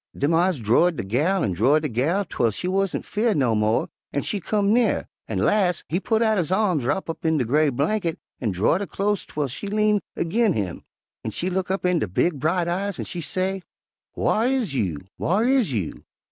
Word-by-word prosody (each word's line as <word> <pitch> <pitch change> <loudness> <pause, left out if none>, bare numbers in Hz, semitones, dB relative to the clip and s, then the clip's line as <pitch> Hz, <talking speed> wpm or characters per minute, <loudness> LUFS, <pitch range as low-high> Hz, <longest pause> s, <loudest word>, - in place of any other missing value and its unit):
Dem 145 +4 +1
eyes 175 -2 +2
drord 125 +11 +3
de - - -3
gal 150 - +1
an' 100 - 0
drord 135 - +3
de - - +1
gal 155 - 0
'twel 120 -9 0
she 110 - -4
warn't 195 0 0
'feared 215 -3 0
no 125 -5 +2
mo', 105 +1 +1 0.2
an' 140 - -1
she 205 - -2
come 205 +3 +1
nearer, 240 0 +2 0.2
an' - - -3
las' 185 -5 +2
he 175 - 0
putt 225 +3 +1
out 220 -3 +2
his 170 0 -1
arms 185 - +2
wrop 190 +9 -1
up 165 - -6
in 160 -1 +2
de 130 - +1
gray 150 +5 +3
blanket 165 - -1 0.2
an' 115 - -1
drord 100 - +1
her 200 - -3
clost 205 0 -1
'twel 150 -2 -2
she 140 - -6
lean 210 0 +2 0.2
erg'in 215 +4 +2
him, 95 - -3 0.4
an' - - -2
she 185 +2 -3
look 185 0 -1
up 190 0 -1
in 180 -2 +3
de 110 - -1
big, 140 - 0
bright 170 +4 +1
eyes 190 +3 -2
an' - - -4
she 175 - -5
say, 190 +3 -2 0.5
'Whar 225 +3 +1
is 255 - 0
you, 90 - -1 0.2
whar 200 +7 +1
is 255 - +2
you?' 100 - -3
175 Hz, 215 wpm, -24 LUFS, 140-200 Hz, 0.5 s, drord